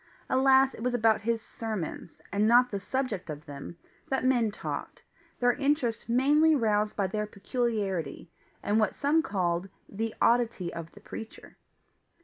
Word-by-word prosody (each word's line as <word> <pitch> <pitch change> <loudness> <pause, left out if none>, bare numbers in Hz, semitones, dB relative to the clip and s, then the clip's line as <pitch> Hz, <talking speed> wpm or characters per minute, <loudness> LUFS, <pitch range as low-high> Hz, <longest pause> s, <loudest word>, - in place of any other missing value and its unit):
Alas, 265 0 +5
it - - -10
was 245 +1 0
about 225 -2 +3
his 225 +1 -1
sermons, 210 -7 -6
and 205 +2 +2
not 245 +2 +5
the 200 - -2
subject 225 -5 -3
of 150 +1 -6
them, 145 +3 -8 0.3
that 265 -1 0
men 245 -4 +3
talked, 205 - -6 0.4
their 245 0 +4
interest 275 -6 0
mainly 295 +6 +4
roused 210 -4 +1
by 200 - +1
their 210 +2 -2
PECULIARITY, 200 - -2 0.4
and 210 +2 +2
what 215 -3 +1
some 300 +3 +2
called 185 - -1 0.2
the 220 +2 -4
oddity 230 -7 +2
of 165 -1 -7
the 205 - -15
preacher. 220 +1 -9
225 Hz, 150 wpm, -29 LUFS, 200-250 Hz, 0.4 s, Alas